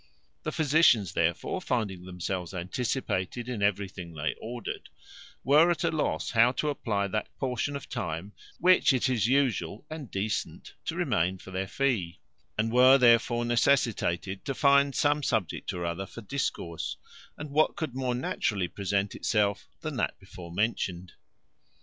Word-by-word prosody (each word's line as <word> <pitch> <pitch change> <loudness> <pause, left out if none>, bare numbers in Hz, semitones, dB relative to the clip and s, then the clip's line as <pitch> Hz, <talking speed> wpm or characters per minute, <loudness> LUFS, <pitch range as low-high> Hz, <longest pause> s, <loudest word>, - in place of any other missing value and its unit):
The - - -3
physicians, 140 - +4
therefore, 85 0 0
finding 100 -7 -2
themselves 90 0 -4
anticipated 115 +3 -2
in 120 -5 -4
everything 95 -4 -1
they 75 0 -1
ordered, 120 +1 -6 0.5
were 150 +5 +6
at 175 - 0
a - - +2
loss 155 - -1
how 120 +1 +5
to 150 - -1
apply 105 -8 -1
that 110 +2 -2
portion 130 +2 -2
of 140 - -6
time 100 -5 -4 0.2
which 180 -4 +5
it 130 0 +1
is 115 -4 +1
usual 120 - +1
and 155 -6 -6
decent 105 +2 -3
to - - -2
remain 90 +3 +1
for 95 - -12
their 95 +1 -2
fee, 100 - -1 0.4
and 115 +1 0
were 130 +2 +7
therefore 120 -1 +4
necessitated 115 -7 +1
to 135 -2 -3
find 140 0 +4
some 145 0 +2
subject 110 - -1
or 90 -1 -4
other 85 +3 -3
for 115 - -10
discourse; 95 - -3 0.4
and 150 -1 -7
what 155 +2 +3
could 155 -7 -4
more 130 -1 -1
naturally 105 -6 -1
present 100 +1 -1
itself 100 -2 0
than - - -4
that - - -1
before 85 -2 -11
mentioned? 95 -3 -1
115 Hz, 150 wpm, -28 LUFS, 95-130 Hz, 0.5 s, were